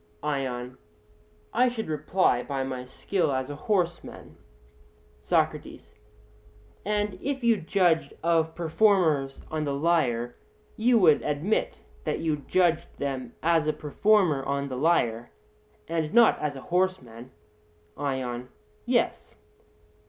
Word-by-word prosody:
ION: 130 -4 -3 0.7
I 250 +2 +4
should 230 -2 -5
reply, 155 -3 +1
by 135 +1 -3
my 130 -1 -5
skill 160 +5 -1
as 130 +1 -2
a - - -6
horseman. 175 0 -2 0.9
SOCRATES: - - -1 0.9
And 205 -2 -1
if 275 -2 -3
you 230 -2 +4
judged 165 -4 +1
of 165 -1 +1
performers 165 -6 +2
on 155 -1 -1
the 140 -2 -2
lyre, 130 -7 0 0.4
you 235 +2 +3
would 165 -8 +5
admit 150 +9 -1 0.2
that - - -1
you 160 -2 -1
judged 170 +2 +1
of - - -27
them 135 -3 -4
as 165 -2 +2
a 155 - +2
performer 155 +1 +2
on 140 +1 -2
the 130 - -4
lyre, 120 -6 +1 0.6
and 160 -2 -2
not 235 -1 +6
as 150 -2 -2
a 135 - -8
horseman? 150 -11 -2 0.7
ION: 130 -3 -3 0.4
Yes. - - 0
155 Hz, 125 wpm, -27 LUFS, 135-180 Hz, 0.9 s, not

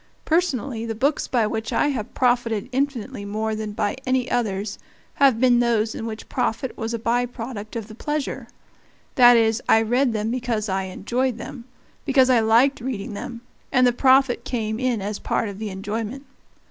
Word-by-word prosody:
Personally 280 -8 0
the 225 -1 -3
books 280 +6 0
by 235 -4 +2
which 220 +1 -3
I 290 - +2
have 240 -7 -4
profited 240 -3 +1
infinitely 260 -4 -2
more 215 +2 -2
than 215 -1 -4
by 205 +1 -1
any 255 -1 0
others 205 -4 -1 0.4
have 265 -5 +5
been 245 -1 +4
those 230 -2 +1
in 225 - -5
which 220 -1 -7
profit 250 +3 -2
was 225 0 -4
a - - -2
by 240 +2 0
product 225 -3 -7
of 225 -3 -4
the 220 - -11
pleasure; 295 +5 -3 0.7
that 245 -1 +7
is, 225 +1 +2
I 225 - +6
read 245 +3 +2
them 220 0 -1
because 235 -3 -2
I 190 -1 -1
enjoyed 235 +6 -2
them, 235 +1 -8 0.4
because 265 -3 +4
I 245 - +5
liked 230 +5 +3
reading 235 -3 -4
them, 235 +3 -7 0.3
and 255 -1 +4
the 245 - +4
profit 260 -1 +4
came 220 -4 -2
in 250 -5 0
as 205 +1 -3
part 225 - -1
of 200 0 -8
the 215 -1 -4
enjoyment. 215 +7 -5
235 Hz, 185 wpm, -23 LUFS, 215-255 Hz, 0.7 s, that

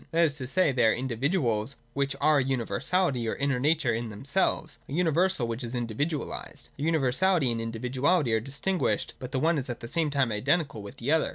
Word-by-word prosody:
That 170 +1 +3
is 145 -2 -1
to 130 - -4
say, 180 +3 +3
they 120 -3 +3
are 110 - +4
individuals, 130 - -1 0.2
which 140 0 -1
are 155 -1 +4
a - - +2
universality 130 - 0
or - - -2
inner 140 -2 0
nature 150 -1 +2
in 115 0 -3
themselves, 135 - -1
— - - -28
a - - -6
universal 175 -3 +2
which 115 +2 -4
is 120 +1 -4
individualised. 125 +6 -3
Their 145 +3 -2
universality 160 0 +2
and 115 -1 -2
individuality 125 +5 0
are 110 - +3
distinguished, 140 - -1
but 130 -2 -7
the 135 - -1
one 160 +2 +2
is 130 - -6
at 120 - -4
the 115 - -6
same 160 +4 0
time 140 -4 +1
identical 140 +3 0
with 100 0 -10
the 125 +5 -2
other. 160 0 +3
135 Hz, 210 wpm, -28 LUFS, 120-160 Hz, 0.2 s, are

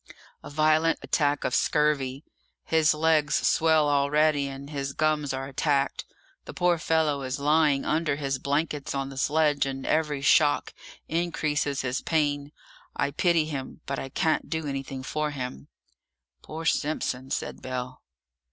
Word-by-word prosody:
"A - - -8
violent 155 +2 +3
attack 145 -2 +1
of - - -1
scurvy. 145 -2 +1 0.4
His 160 -1 +3
legs 155 -1 +2
swell 160 -2 +3
already, 145 0 +2
and 135 0 -8
his 140 -1 -3
gums 155 -2 0
are 135 0 -4
attacked; 140 0 0 0.4
the - - -9
poor 175 -2 +2
fellow 155 -3 +1
is 130 +2 -3
lying 150 -1 +3
under 155 -2 +1
his 140 -2 -2
blankets 145 +1 -2
on 135 0 -2
the 135 - -9
sledge, 150 0 +2
and 135 -1 -5
every 150 -3 0
shock 145 +1 +3 0.3
increases 155 -4 -1
his 125 0 -2
pain. 145 -2 0 0.4
I 140 - 0
pity 165 +1 +2
him, 145 -1 -6
but 140 - -3
I 135 - -6
can't 160 +4 0
do 160 -1 -2
anything 135 -1 -5
for 150 +3 -2
him!" 125 - -6 0.7
"Poor 160 +1 -7
Simpson!" 135 -4 -1
said - - -4
Bell. 130 0 -5
145 Hz, 145 wpm, -26 LUFS, 135-155 Hz, 0.7 s, violent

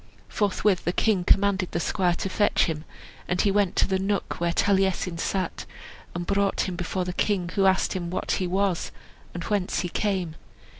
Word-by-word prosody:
Forthwith 205 -2 +1
the 175 - +1
king 205 -4 +2
commanded 195 0 +2
the 170 - 0
squire 175 +1 +1
to - - -3
fetch 205 +2 +2
him; 160 -2 -4 0.4
and 180 - -1
he 200 - +3
went 200 -2 +1
to - - +3
the 190 -1 0
nook 195 +1 -2
where 170 0 +1
Taliesin 190 -2 +1
sat, 185 -1 -2 0.5
and 175 0 -3
brought 200 +1 +1
him 185 - -2
before 180 +1 -2
the 180 - -3
king, 185 -4 0
who 195 -1 +3
asked 190 0 +2
him 175 -2 -3
what 185 - -2
he 185 - 0
was, 190 -1 0 0.4
and 170 - -4
whence 200 -2 0
he 175 - -3
came. 185 -4 -1
190 Hz, 190 wpm, -26 LUFS, 175-200 Hz, 0.5 s, he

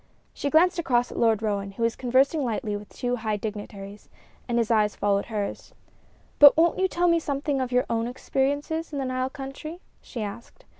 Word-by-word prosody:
She 285 - -3
glanced 355 +4 +4
across 245 -7 +1
at - - -5
Lord 225 -2 +2
Roane, 200 -2 -2
who 230 - -4
was 230 0 +1
conversing 265 +4 +2
lightly 225 -3 -2
with 205 0 -8
two 245 0 -2
high 215 -2 -2
dignitaries, 205 -1 -7 0.4
and 240 -1 0
his 230 -1 +1
eyes 210 -2 +2
followed 200 -1 +1
hers. 210 -3 -5 0.6
"But 290 0 +9
won't 335 +2 +3
you 380 - +3
tell 355 -1 0
me 335 -1 +4
something 280 -2 -2
of 255 -1 -3
your 250 0 +2
own 230 0 -1
experiences 285 +6 -2
in 290 - -4
the 270 - -2
Nile 255 0 -1
country?" 275 +5 -8 0.2
she 235 -4 -6
asked. 235 - -9
250 Hz, 195 wpm, -25 LUFS, 215-285 Hz, 0.6 s, But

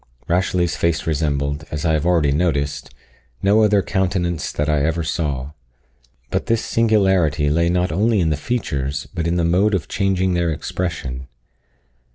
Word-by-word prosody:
Rashleigh's 90 -1 +1
face 85 -3 0
resembled, 70 -1 -1
as 75 +3 -4
I 80 - +3
have 80 +2 0
already 80 -5 +3
noticed, 70 -2 -1 0.5
no 100 +3 +4
other 105 -2 +3
countenance 90 -3 -1
that 75 - -2
I 75 -2 +2
ever 80 +2 0
saw. 75 -4 -2 0.8
But - - -1
this 115 -1 +1
singularity 95 -10 +2
lay 85 +2 +2
not 90 -1 +1
only 105 +5 +2
in 80 -3 +2
the - - +1
features, 70 - -3
but 85 -1 -2
in 85 - 0
the 85 -1 +1
mode 95 +5 +3
of 90 - -3
changing 95 -2 0
their 85 -1 +1
expression. 75 -5 -4
85 Hz, 160 wpm, -20 LUFS, 75-95 Hz, 0.8 s, no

